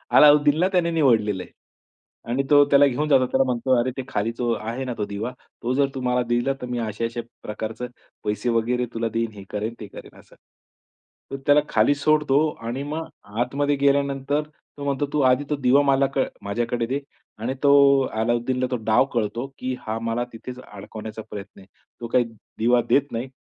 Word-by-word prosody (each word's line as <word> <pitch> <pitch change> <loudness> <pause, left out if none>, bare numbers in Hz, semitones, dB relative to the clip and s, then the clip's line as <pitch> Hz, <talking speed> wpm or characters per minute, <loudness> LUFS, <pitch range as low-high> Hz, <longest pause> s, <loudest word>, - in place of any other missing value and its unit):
अलाउद्दीनला 150 +3 +6
त्याने 175 -2 +2
निवडलेलं 110 - +2
आहे - - -16 0.8
आणि 135 +3 +1
तो 145 -1 +7
त्याला 140 0 +6
घेऊन 145 +3 -1
जातो, 135 -3 +5
त्याला 130 +1 +2
म्हणतो, 125 +1 -1
"अरे 125 +2 0
ते 135 - -3
खाली 105 +3 -1
जो 120 -1 0
आहे 115 +4 -4
ना, 125 - -3
तो 105 - -1
दिवा, 105 +4 -4 0.3
तो 120 +2 0
जर 140 +1 +3
तू 130 - -4
मला 125 0 +1
दिला 120 +3 +1
तर - - -3
मी 125 -1 -3
अशा-अशा 115 +2 -3 0.2
प्रकारचे 110 +3 -5 0.4
पैसे 105 +4 -1
वगैरे 120 +2 +1
तुला 115 0 -1
देईन, 115 0 -1
हे 100 -2 -10
करेन, 105 +2 -3
ते 105 - -7
करेन," - - -13
असं. - - -19 1.0
तर - - -3
त्याला 145 +1 +6
खाली 145 - +3
सोडतो 145 -1 +3 0.3
आणि 130 +4 -3
मग 155 +3 -4 0.3
आतमध्ये 145 +3 0
गेल्यानंतर 140 0 +1 0.4
तो 145 - -7
म्हणतो, 140 +1 0
"तू 150 - +2
आधी 130 +3 +1
तो 150 - +1
दिवा 135 +3 +6
मला 135 0 +3
क - - +3 0.2
माझ्याकडे 115 +3 -1
दे" 135 +3 -1 0.4
आणि 115 +5 -2
तो 140 - +6 0.5
अलाउद्दीनला 120 +2 0
तो 125 - 0
डाव 110 +4 +4
कळतो 115 +3 -1
की 130 0 -3
हा 110 +1 -1
मला 115 +1 -1
तिथेच 125 +2 -8
अडकवण्याचा 110 0 -9
प्रयत्न 100 0 -9
आहे. 95 - -17 0.3
तो 120 - -4
काही 125 +1 +3 0.4
दिवा 120 +2 +4
देत 140 0 +3
नाही 120 +3 -4
125 Hz, 185 wpm, -23 LUFS, 115-140 Hz, 1.0 s, तो